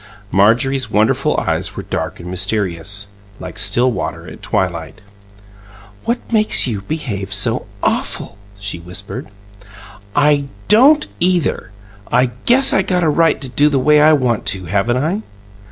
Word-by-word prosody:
Marjorie's 120 +5 +2
wonderful 105 +1 +1
eyes - - -2
were - - -4
dark - - -4
and 85 - -9
mysterious, 95 +1 -1 0.3
like 105 - -7
still 115 +5 +2
water - - -5
at - - -11
twilight. 85 +1 -2 1.1
"What 235 0 -3
makes 215 -1 +3
you 110 -6 -3
behave 100 -8 -5
so 110 +4 +1 0.2
AWFUL?" - - -1 0.2
she 100 -3 -5
whispered. 90 +5 -5 0.9
"I 145 -1 +3 0.2
don't 270 +9 +6
either! 175 -9 +1 0.4
I 125 +1 +3 0.2
guess 265 +3 +4
I - - +4
got 180 -2 0
a 160 - +3
right 165 +2 +2
to 135 - -5
do 145 +4 +3
the 140 - 0
way 150 +3 +4
I 155 +1 +6
want 125 -6 0
to, 95 -2 0
haven't 100 +7 0
I?" 165 +10 -1
120 Hz, 145 wpm, -17 LUFS, 100-155 Hz, 1.1 s, don't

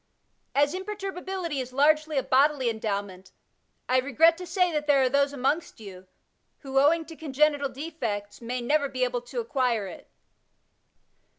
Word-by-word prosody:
As 285 +2 +3
imperturbability 380 -4 -4
is 255 -1 -5
largely 305 +3 +2
a 265 - +2
bodily 265 -2 +3
endowment, 200 -4 -4 0.6
I 255 0 +3
regret 295 +6 +4
to 360 - -7
say 360 -2 +1
that 300 -1 -2
there 280 -2 +4
are 255 - +3
those 280 +1 +2
amongst 285 +3 -2
you, 190 -3 -11 0.5
who, 270 -1 0
owing 320 +4 +3
to 325 +1 -11
congenital 290 -1 +1
defects, 240 -10 -5
may 245 +2 -3
never 285 +3 +1
be 255 -1 -2
able 245 -1 -1
to 245 - -6
acquire 255 - 0
it. 185 - -10
280 Hz, 155 wpm, -26 LUFS, 245-315 Hz, 0.6 s, regret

